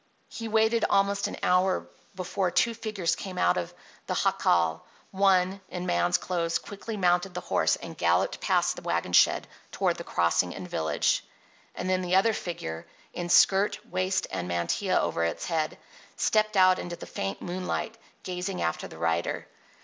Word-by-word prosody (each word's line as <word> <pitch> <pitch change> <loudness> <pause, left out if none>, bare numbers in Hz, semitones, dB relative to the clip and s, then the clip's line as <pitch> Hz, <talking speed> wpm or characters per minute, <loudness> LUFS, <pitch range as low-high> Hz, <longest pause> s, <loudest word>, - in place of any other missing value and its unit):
He 230 - -6
waited 220 +1 +2
almost 200 0 +2
an - - -6
hour 185 +1 +2 0.3
before 185 +1 -1
two 235 +6 +2
figures 210 -7 -2
came 185 +2 -7
out 90 - +3
of 90 - -3 0.4
the - - -1
jacal. 85 -2 +2 0.3
One, 190 0 +2
in 180 0 -5
man's 175 0 +2
clothes, 170 -2 -1
quickly 210 +2 -7
mounted 180 0 +1
the 180 - -3
horse - - +1
and - - -9
galloped - - +1
past - - +2
the - - -8
wagon - - -2
shed - - +4 0.2
toward - - 0
the - - -6
crossing 85 +1 +1
and 90 - -7
village. 80 -2 0 0.5
And 180 - -4
then 185 0 +1
the 180 0 0
other 220 +4 +4
figure, 85 - -5 0.3
in 175 0 -4
skirt, 195 +3 +5
waist, 185 +1 0
and 90 - -3
mantilla 85 -1 0
over 85 - 0
its 85 - -2
head, 160 -3 -1 0.4
stepped 215 -1 +2
out 185 -1 +6
into 175 -1 -5
the - - -9
faint 95 0 -4
moonlight, 185 +5 -3 0.3
gazing 180 +1 -4
after 85 - -2
the - - -12
rider. 85 +1 -1
180 Hz, 165 wpm, -27 LUFS, 160-195 Hz, 0.5 s, out